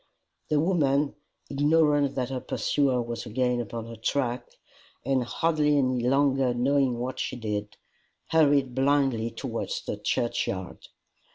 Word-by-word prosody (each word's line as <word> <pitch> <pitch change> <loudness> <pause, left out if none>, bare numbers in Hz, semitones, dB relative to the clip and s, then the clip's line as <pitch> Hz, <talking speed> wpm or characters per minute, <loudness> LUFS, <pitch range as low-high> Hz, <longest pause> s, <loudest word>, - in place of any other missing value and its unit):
The 150 - +2
woman, 150 -4 +2 0.3
ignorant 145 -1 +2
that 130 -1 -2
her 130 - -2
pursuer 130 -1 0
was 120 0 -5
again 125 +2 0
upon 115 0 -6
her 115 0 -8
track, 120 +2 -2 0.6
and 135 -1 +1
hardly 150 +2 +1
any 130 -2 +1
longer 135 0 +2
knowing 130 0 +2
what 125 +2 -4
she - - -2
did, 105 -3 -4 0.5
hurried 145 -5 +3
blindly 135 -4 +2
towards - - -4
the - - -3
churchyard. 95 -6 -2
130 Hz, 125 wpm, -27 LUFS, 120-145 Hz, 0.6 s, hurried